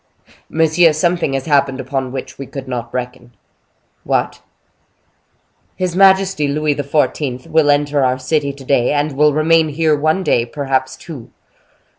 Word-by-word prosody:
"Monsieur, 160 +1 +3
something 170 -2 0
has 135 -1 -2
happened 140 -3 +1
upon 130 0 -3
which 130 +1 -7
we 135 - -6
could 135 -2 -8
not 120 -2 -5
reckon." 125 -1 -6 0.7
"What?" - - -1 1.3
"His 180 -2 -2
majesty 190 -4 +3
Louis 150 +1 0
XIV. 140 -2 -1
will 160 -2 +2
enter 145 -1 +2
our 130 0 +1
city 140 +2 -1
to 135 -1 -13
day, 130 -1 +2
and 145 +1 0
will 150 +2 +4
remain 160 +1 +3
here 155 +1 +1
one 155 +6 0
day, 120 - +2
perhaps 135 -1 -2
two." 140 -9 -10
145 Hz, 145 wpm, -17 LUFS, 130-155 Hz, 1.3 s, will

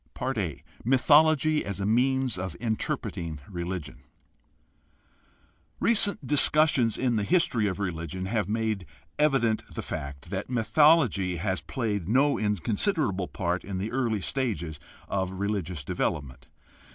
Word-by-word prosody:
a) 95 - -2 0.2
Mythology 150 +4 +4
as 100 0 -5
a 100 - -1
means 130 +2 +2
of 95 -2 -5
interpreting 85 -8 -3
religion. 85 -6 -5 0.5
— - - -10
Recent 210 -2 +4
discussions 145 -5 +3
in 125 -3 +1
the 105 - 0
history 125 - +2
of 95 - -2
religion 90 -1 -4
have 105 -1 -1
made 110 -4 -1 0.3
evident 135 -7 +2
the - - -5
fact 70 +2 -6
that 100 +3 -4
mythology 125 - +3
has 95 -1 -2
played 105 -4 -3
no 140 +5 +3
inconsiderable 105 - 0
part 90 0 -2
in 95 -2 -5
the 100 +4 -3
early 120 -5 0
stages 90 - -3 0.3
of 95 -1 -2
religious 95 -5 -3
development. 70 -1 -3
105 Hz, 125 wpm, -27 LUFS, 90-130 Hz, 0.5 s, Mythology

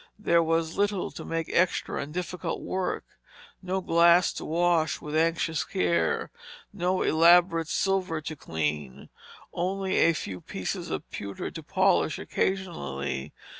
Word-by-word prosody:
There 170 -5 +3
was 165 0 0
little 205 -2 0
to - - -8
make 165 -1 -3
extra 185 +1 +1
and 145 - -6
difficult 180 +1 -4
work, 185 -1 -2 0.6
no 190 0 -2
glass 170 +1 +5
to - - -6
wash 165 -1 +1
with 150 0 -6
anxious 165 -1 +1
care, 85 -2 0 0.4
no 185 -1 0
elaborate 165 0 +5
silver 185 -2 0
to 155 +1 -6
clean, 75 - -4 0.4
only 190 +2 -1
a 165 - +5
few 95 - -5
pieces - - -4
of - - -4
pewter 100 -1 -5
to 165 - -7
polish 185 -1 +2
occasionally. 75 - -3
165 Hz, 130 wpm, -27 LUFS, 155-185 Hz, 0.6 s, glass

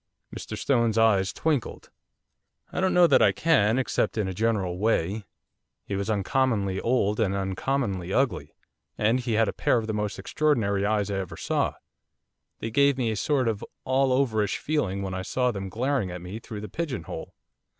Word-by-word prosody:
Mr - - -6
Stone's 115 -5 +1
eyes 100 -4 +3
twinkled. 150 -8 -2 0.8
'I - - -1
don't 190 - +2
know 180 -1 +7
that - - +5
I - - +6
can, 125 -9 +3
except 130 -3 0
in 105 -3 0
a 95 - -3
general 95 -4 0
way, 105 -1 0 0.6
he 100 - -3
was 100 +2 -2
uncommonly 105 -2 +1
old 115 -3 +1
and 100 -3 +1
uncommonly 95 -1 -2
ugly, 135 +4 0 0.4
and 115 +4 +2
he 120 -2 -2
had 110 0 +3
a - - -2
pair - - +2
of 115 - -1
the 110 - -3
most 105 -1 -2
extraordinary 105 -10 +1
eyes 105 -1 0
I 95 - -1
ever 95 - -6
saw, - - -1 0.9
they 115 - -3
gave 140 +2 +3
me 120 -4 0
a - - -2
sort 130 +3 +1
of 110 -3 -1 0.2
all 130 0 +2
overish 110 -6 +1
feeling 100 -11 -1
when 95 -1 -4
I 95 - -3
saw 125 +6 0
them 95 -3 -5
glaring 125 0 -1
at 90 0 -6
me 95 +5 -6
through 110 -3 -8
the 105 - -6
pigeon 150 - -4
hole. - - -8
110 Hz, 185 wpm, -26 LUFS, 100-130 Hz, 0.9 s, know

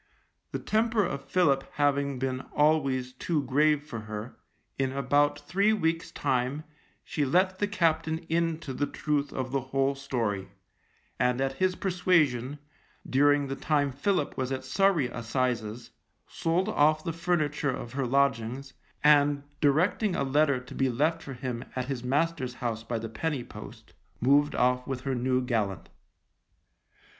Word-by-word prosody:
The - - -2
temper 220 -1 +1
of 140 -5 -4
Philip 140 -7 +3
having 140 -1 +1
been 130 0 -2 0.2
always 135 -4 +2
too 150 +3 -1
grave 145 +3 +2
for 145 -7 -6
her, 110 +2 -7 0.4
in 135 -1 +1
about 145 +2 +2
three 195 +9 +1
weeks' 165 -5 0
time 135 +2 -1 0.4
she 150 - -2
let 185 +7 +2
the 205 - +1
captain 165 -5 +1
into 165 -3 -1
the 145 - -1
truth 145 -2 -1
of 130 -1 -4
the 135 0 0
whole 135 +1 0
story, 115 -8 -2 0.7
and 125 0 +2
at 135 0 0
his 185 -1 +1
persuasion, 155 -9 +1 0.5
during 145 +1 +3
the 135 0 -4
time 145 -1 +1
Philip 150 +3 0
was 130 0 -2
at 130 -1 -3
Surrey 190 +1 +2
assizes, 120 -2 -2 0.4
sold 175 +4 0
off 155 -5 +3
the 165 - -3
furniture 155 -4 0
of 120 -2 -5
her 135 -2 -1
lodgings, 135 0 0 0.3
and 145 -1 +5 0.2
directing 175 +7 +2
a - - 0
letter 140 0 +2
to 125 - -12
be 135 -1 +1
left 155 +7 +1
for 135 - -7
him 125 -1 -4
at 130 -1 -2
his 130 -2 -4
master's 135 -1 0
house 115 -3 -3
by 115 0 -3
the 115 0 -4
Penny 140 +4 -3
Post, - - -11 0.3
moved 140 +4 +3
off 125 0 +2
with 130 -2 -3
her 135 0 -2
new 130 +1 +1
gallant. 110 -6 -2
140 Hz, 150 wpm, -28 LUFS, 130-155 Hz, 0.7 s, and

